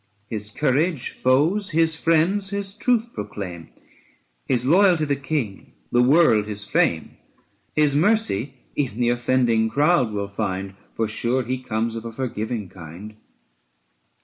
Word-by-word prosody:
His 105 Hz, -2 st, -4 dB
courage 150 Hz, -, 0 dB
foes, 160 Hz, +11 st, +2 dB
his 165 Hz, 0 st, +2 dB
friends 165 Hz, +5 st, +2 dB
his 200 Hz, -1 st, -1 dB
truth 235 Hz, +1 st, 0 dB
proclaim, 95 Hz, -5 st, -7 dB, 0.8 s
His 125 Hz, 0 st, 0 dB
loyalty 175 Hz, +1 st, +4 dB
the 140 Hz, -1 st, 0 dB
King, 135 Hz, -7 st, -4 dB, 0.2 s
the 120 Hz, -, +4 dB
world 125 Hz, -6 st, +4 dB
his 105 Hz, -1 st, -5 dB
fame. -, -, 0 dB, 0.6 s
His 150 Hz, -2 st, +3 dB
mercy 155 Hz, -, +1 dB, 0.2 s
even 125 Hz, -6 st, -2 dB
the 120 Hz, -1 st, +2 dB
offending 120 Hz, -2 st, +2 dB
crowd 145 Hz, -3 st, +2 dB
will 100 Hz, -1 st, -3 dB
find, 95 Hz, -1 st, -3 dB, 0.2 s
For 115 Hz, -, 0 dB
sure 120 Hz, +4 st, 0 dB
he 130 Hz, +2 st, -3 dB
comes 115 Hz, -1 st, -2 dB
of 115 Hz, -, -5 dB
a 115 Hz, -, -5 dB
forgiving 115 Hz, -3 st, -4 dB
kind. 90 Hz, +4 st, -11 dB
130 Hz, 135 wpm, -23 LUFS, 110-160 Hz, 0.8 s, loyalty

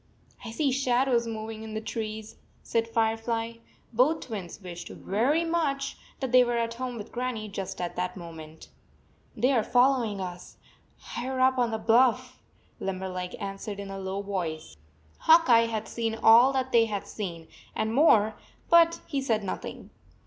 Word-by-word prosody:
"I 235 Hz, -, -6 dB
see 270 Hz, +5 st, 0 dB
shadows 250 Hz, -2 st, +2 dB
moving 220 Hz, -1 st, -5 dB
in 220 Hz, -1 st, -7 dB
the -, -, -1 dB
trees," 220 Hz, -1 st, -5 dB, 0.3 s
said 230 Hz, 0 st, 0 dB
Firefly. 225 Hz, 0 st, -1 dB, 0.4 s
Both 275 Hz, +8 st, +3 dB
twins 200 Hz, -7 st, -7 dB
wished 175 Hz, -3 st, -8 dB
very 255 Hz, -, 0 dB
much 315 Hz, -5 st, -1 dB
90 -, -, -26 dB, 0.2 s
that 265 Hz, -2 st, -2 dB
they 255 Hz, 0 st, +7 dB
were 240 Hz, -1 st, -1 dB
at 230 Hz, 0 st, -1 dB
home 250 Hz, 0 st, -5 dB
with 215 Hz, 0 st, -8 dB
Grannie 245 Hz, -3 st, -3 dB
just 195 Hz, -1 st, -5 dB
at 175 Hz, -1 st, -3 dB
that 180 Hz, +2 st, -2 dB
moment. 160 Hz, -2 st, -10 dB, 0.3 s
" -, -, -33 dB
They 255 Hz, -, +3 dB
are 245 Hz, -4 st, +3 dB
following 245 Hz, -3 st, +2 dB
us/higher 235 Hz, +7 st, -8 dB
up 260 Hz, 0 st, +3 dB
on 240 Hz, -1 st, +2 dB
the 220 Hz, -, -2 dB
bluff," 250 Hz, +3 st, +2 dB, 0.4 s
Limberleg 185 Hz, -1 st, -4 dB
answered 200 Hz, +1 st, -5 dB
in 200 Hz, -1 st, -6 dB
a 195 Hz, -, -6 dB
low 190 Hz, +1 st, -4 dB
voice. 170 Hz, -, -4 dB, 0.4 s
Hawk 330 Hz, +1 st, +6 dB
Eye 230 Hz, -2 st, +6 dB
had 220 Hz, -1 st, -3 dB
seen 225 Hz, -1 st, -2 dB
all 230 Hz, +4 st, +7 dB
that 260 Hz, -1 st, -1 dB
they 230 Hz, -1 st, +5 dB
had 205 Hz, -3 st, -4 dB
seen, 170 Hz, -6 st, -6 dB, 0.3 s
and 220 Hz, +1 st, -1 dB
more, 225 Hz, -7 st, +5 dB, 0.4 s
but 335 Hz, 0 st, +5 dB
he 280 Hz, -4 st, -2 dB
said 225 Hz, -5 st, 0 dB
nothing. 190 Hz, -, -6 dB
225 Hz, 165 wpm, -27 LUFS, 200-255 Hz, 0.4 s, they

